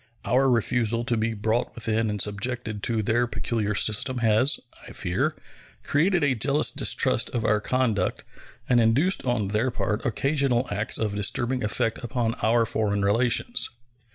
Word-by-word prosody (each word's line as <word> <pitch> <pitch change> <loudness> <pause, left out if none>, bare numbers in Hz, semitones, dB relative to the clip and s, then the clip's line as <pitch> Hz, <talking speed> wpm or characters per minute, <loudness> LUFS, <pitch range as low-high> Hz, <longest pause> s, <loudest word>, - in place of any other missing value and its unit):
Our 130 +3 +2
refusal 120 -1 +1
to 120 -1 0
be 115 0 -1
brought 110 +3 -1
within 110 -1 -1
and 105 0 -3
subjected 110 +1 -2
to 110 0 0
their 120 +3 +1
peculiar 110 -3 -2
system 110 +5 +3
has, 115 +4 +3 0.3
I - - -10
fear, - - -1 0.5
created 170 +3 +1
a 140 -2 +2
jealous 140 +5 +1
distrust - - +2
of 115 -1 -1
our 105 -1 +2
conduct 115 -6 -1 0.4
and 120 -1 +3
induced 135 +12 +2
on 110 -5 0
their 110 +5 0
part 110 -3 -3
occasional 135 0 0
acts 105 +2 -1
of 105 -2 -2
disturbing 120 +5 -1
effect 110 +1 0
upon 120 -2 -2
our 115 +1 +2
foreign 100 -2 -1
relations. 120 - +2
115 Hz, 155 wpm, -25 LUFS, 105-125 Hz, 0.5 s, system